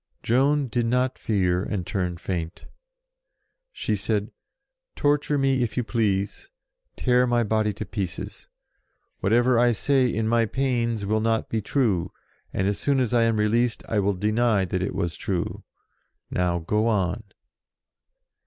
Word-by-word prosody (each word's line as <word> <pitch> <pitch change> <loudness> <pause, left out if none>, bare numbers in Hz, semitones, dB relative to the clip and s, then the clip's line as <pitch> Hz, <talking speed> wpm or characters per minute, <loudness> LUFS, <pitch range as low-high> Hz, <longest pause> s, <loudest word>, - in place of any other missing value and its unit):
Joan 140 +4 +2
did 120 0 -1
not 125 +2 0
fear 90 -4 +1
and 100 -3 -3
turn 90 -2 -2
faint. 85 -1 -5 1.1
She 110 - -2
said, 105 +1 -1 0.6
"Torture 145 0 +1
me 135 -2 +2
if 120 -1 -2
you 125 - +2
please. 110 - -1 0.5
Tear 125 0 +2
my 120 -1 +2
body 110 0 +1
to 110 - -6
pieces. 95 -2 -5 0.7
Whatever 120 +4 +3
I 120 0 +4
say 130 +4 +2
in 110 -2 -1
my 115 0 +2
pains 120 -4 -1
will 110 +2 +1
not 115 0 0
be 110 - -1
true, 100 -8 0 0.4
and 95 - -1
as 100 - -1
soon 140 -2 +1
as 125 -2 0
I 115 -1 +4
am 115 -1 +1
released 115 +3 +1
I 110 - 0
will 100 0 +1
deny 105 +1 +2
that 90 0 -2
it 95 - -2
was 85 -5 -2
true. 90 -3 -3 0.7
Now, 90 -1 +1
go 105 +7 0
on 95 -5 0
110 Hz, 150 wpm, -25 LUFS, 100-120 Hz, 1.1 s, I